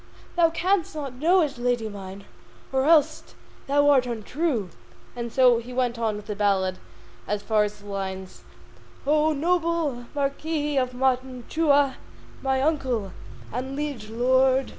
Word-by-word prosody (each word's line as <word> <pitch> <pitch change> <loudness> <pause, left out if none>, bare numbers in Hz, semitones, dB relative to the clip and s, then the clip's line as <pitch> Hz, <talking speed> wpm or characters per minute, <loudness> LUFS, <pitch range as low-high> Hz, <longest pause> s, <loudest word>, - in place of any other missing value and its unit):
Thou 340 -2 +5
canst 340 +1 0
not 280 -4 -5
know 355 +5 +4
it, 280 -5 -4
lady 240 -2 0
mine, 195 -1 -9 0.5
Or 265 0 +2
else 310 -1 +3 0.3
thou 285 +1 +3
art 260 -3 +4
untrue. 235 - -2 0.4
And 235 -1 -4
so 250 -1 +5
he 245 +2 -9
went 245 -2 0
on 220 -2 0
with 210 - -8
the 210 - -4
ballad 195 -2 +1 0.5
as 205 0 -2
far 215 -2 +2
as 210 0 -7
the - - -16
lines: 190 -2 -6 0.6
O 305 +2 +3
noble 325 -5 0
Marquis 295 +1 -1
of 255 -1 0
Mantua, 265 +3 +1 0.4
My 265 0 +1
Uncle 260 - 0 0.4
and 260 +3 -4
liege 280 -7 -4
lord! 260 +3 +3
260 Hz, 140 wpm, -25 LUFS, 220-295 Hz, 0.6 s, Thou